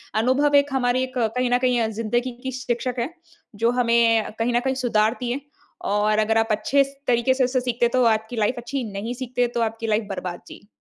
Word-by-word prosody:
अनुभव 260 Hz, +6 st, +2 dB
एक 285 Hz, 0 st, +4 dB
हमारी 255 Hz, 0 st, +1 dB
एक 260 Hz, 0 st, -6 dB
कहीं 245 Hz, +2 st, 0 dB
न -, -, +5 dB
कहीं 250 Hz, -1 st, +2 dB
अ, 225 Hz, -, +1 dB
ज़िन्दगी 230 Hz, +3 st, -1 dB
की 260 Hz, -, -3 dB
शिक्षक 250 Hz, -1 st, -3 dB
है, 240 Hz, +6 st, -1 dB, 0.5 s
जो 230 Hz, +3 st, +2 dB
हमें 235 Hz, -2 st, +3 dB
अ, -, -, -7 dB
कहीं 235 Hz, +2 st, +1 dB
न 240 Hz, -, +3 dB
कहीं 265 Hz, 0 st, -1 dB
सुधारती 230 Hz, +2 st, +1 dB
है। 270 Hz, +3 st, -3 dB, 0.5 s
और 210 Hz, +1 st, +2 dB
अगर 220 Hz, +1 st, +2 dB
आप 225 Hz, -, +1 dB
अच्छे 240 Hz, +7 st, +2 dB
स 275 Hz, 0 st, -11 dB
तरीके 240 Hz, +1 st, +3 dB
से 265 Hz, -, +2 dB
उसे 255 Hz, 0 st, 0 dB
सीखते 240 Hz, -1 st, +1 dB
तो 255 Hz, -, +4 dB
आपकी 220 Hz, +1 st, +1 dB
लाइफ़ 215 Hz, +4 st, +1 dB
अच्छी, 255 Hz, +2 st, -4 dB
नहीं 210 Hz, +5 st, -4 dB
सीखते 245 Hz, -1 st, -1 dB
तो 235 Hz, -, +1 dB
आपकी 225 Hz, 0 st, -2 dB
लाइफ़ 215 Hz, 0 st, +1 dB
बर्बाद। 180 Hz, -2 st, -5 dB
जी। 205 Hz, -, -13 dB
240 Hz, 220 wpm, -23 LUFS, 220-255 Hz, 0.5 s, न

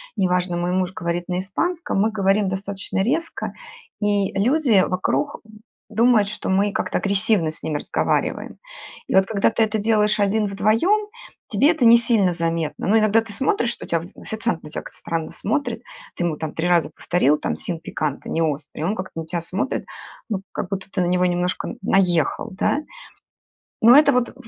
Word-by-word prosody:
не 195 Hz, -4 st, +1 dB
важно, 180 Hz, -1 st, 0 dB
мой 175 Hz, +1 st, -1 dB
муж 185 Hz, 0 st, 0 dB
говорит 175 Hz, -3 st, -3 dB
на 180 Hz, 0 st, -1 dB
испанском, 325 Hz, -, -2 dB
мы 220 Hz, +2 st, +2 dB
говорим 195 Hz, -1 st, +1 dB
достаточно 195 Hz, 0 st, -3 dB
резко, 320 Hz, +9 st, -2 dB, 0.5 s
и 205 Hz, -2 st, +1 dB
люди 240 Hz, -3 st, +4 dB
вокруг 185 Hz, +10 st, -1 dB, 0.5 s
думают, 220 Hz, -1 st, +3 dB
что 210 Hz, -, -5 dB
мы 200 Hz, +2 st, +2 dB
как-то -, -, -1 dB
агрессивно 200 Hz, -4 st, +1 dB
с 155 Hz, -, -10 dB
ними 150 Hz, -, -1 dB
разговариваем. -, -, -1 dB, 0.5 s
И -, -, -1 dB
вот 190 Hz, 0 st, +5 dB
когда 200 Hz, 0 st, +1 dB
ты 225 Hz, 0 st, +1 dB
это 220 Hz, 0 st, -1 dB
делаешь 210 Hz, 0 st, +2 dB
один-вдвоем, 215 Hz, -, +2 dB, 0.4 s
тебе 265 Hz, +9 st, +3 dB
это 315 Hz, -6 st, -1 dB
не 230 Hz, +1 st, +9 dB
сильно 225 Hz, -6 st, +2 dB
заметно. 165 Hz, -2 st, -2 dB
Но 220 Hz, -, +4 dB
иногда 215 Hz, +1 st, +3 dB
ты 220 Hz, -2 st, -9 dB
смотришь, 240 Hz, 0 st, 0 dB
что -, -, -8 dB
тя 170 Hz, -, +1 dB
оф 165 Hz, -, -5 dB
официант 220 Hz, -5 st, -3 dB
на 150 Hz, -, -11 dB
тебя -, -, -5 dB
как-то -, -, -9 dB
странно 165 Hz, -1 st, -3 dB
смотрит, 280 Hz, +8 st, -2 dB, 0.3 s
ты 175 Hz, -, -1 dB
ему 155 Hz, -3 st, -1 dB
там 160 Hz, -1 st, -5 dB
3 165 Hz, +2 st, -1 dB
раза 175 Hz, -2 st, +2 dB
повторила 150 Hz, -4 st, +1 dB
там -, -, -2 dB
"sin 170 Hz, -3 st, -5 dB
picante", 150 Hz, -3 st, -3 dB
неострый, 155 Hz, -1 st, -2 dB
он 200 Hz, +5 st, 0 dB
как-то 185 Hz, -4 st, -6 dB
на -, -, -8 dB
тебя 170 Hz, +1 st, -2 dB
смотрит, 185 Hz, +9 st, -1 dB, 0.4 s
ну, 200 Hz, -4 st, -2 dB
как 180 Hz, -, -4 dB
будто 195 Hz, 0 st, -5 dB
ты 185 Hz, -, -1 dB
на 175 Hz, -, +1 dB
него 180 Hz, +1 st, +2 dB
немножко 180 Hz, 0 st, -1 dB
н -, -, -8 dB
наехал, 190 Hz, +2 st, +1 dB
да? 190 Hz, +8 st, 0 dB, 1.0 s
Но 235 Hz, +4 st, +8 dB
это 290 Hz, -1 st, +6 dB
вот 250 Hz, -1 st, +1 dB
в -, -, -19 dB
195 Hz, 185 wpm, -22 LUFS, 175-220 Hz, 1.0 s, не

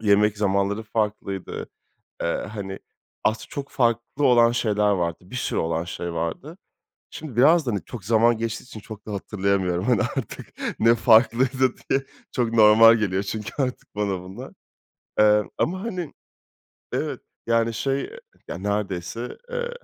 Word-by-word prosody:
yemek 105 Hz, 0 st, +3 dB
zamanları 100 Hz, +1 st, +1 dB
farklıydı. 105 Hz, -3 st, -3 dB, 0.5 s
Eee, -, -, 0 dB, 0.3 s
hani, 95 Hz, -2 st, -5 dB, 0.5 s
az 110 Hz, 0 st, 0 dB
çok 140 Hz, -1 st, -6 dB
farklı 120 Hz, +3 st, 0 dB
olan 120 Hz, -2 st, +5 dB
şeyler 105 Hz, -3 st, +1 dB
vardı, 85 Hz, -4 st, 0 dB
bir 125 Hz, -, -6 dB
sürü -, -, -1 dB
olan 80 Hz, +1 st, -1 dB
şey 85 Hz, -1 st, -5 dB
vardı. 85 Hz, -, -4 dB, 0.5 s
Şimdi 150 Hz, -7 st, -8 dB
biraz 155 Hz, +5 st, +5 dB
da 120 Hz, -, 0 dB
hani 100 Hz, -, -2 dB
çok 110 Hz, -7 st, -9 dB
zaman 115 Hz, +1 st, +4 dB
geçtiği 115 Hz, 0 st, -3 dB
için 125 Hz, -4 st, -10 dB
çok 110 Hz, 0 st, -11 dB
da 105 Hz, -, -5 dB
hatırlayamıyorum, 95 Hz, -3 st, -1 dB
hani, 120 Hz, -4 st, +3 dB
artık -, -, -4 dB, 0.3 s
ne 115 Hz, +1 st, +5 dB
farklıydı 120 Hz, +3 st, +4 dB
diye 135 Hz, 0 st, +2 dB, 0.3 s
çok 115 Hz, -2 st, -1 dB
normal 110 Hz, +1 st, +8 dB
geliyor 100 Hz, -3 st, 0 dB
çünkü 105 Hz, +1 st, -5 dB
artık 125 Hz, -4 st, -5 dB
bana 100 Hz, -3 st, -1 dB
bunlar. 100 Hz, +8 st, -9 dB, 0.7 s
Eee, 105 Hz, 0 st, +6 dB, 0.2 s
ama 185 Hz, +3 st, 0 dB
hani 180 Hz, -9 st, -4 dB, 0.8 s
Evet, -, -, -2 dB, 0.3 s
yani, 115 Hz, 0 st, +2 dB
şey, 135 Hz, +4 st, -1 dB
eee 480 Hz, -, -8 dB, 0.3 s
Ya, -, -, -5 dB
neredeyse, 100 Hz, +3 st, -3 dB
eee, 485 Hz, 0 st, -2 dB
110 Hz, 150 wpm, -24 LUFS, 100-125 Hz, 0.8 s, normal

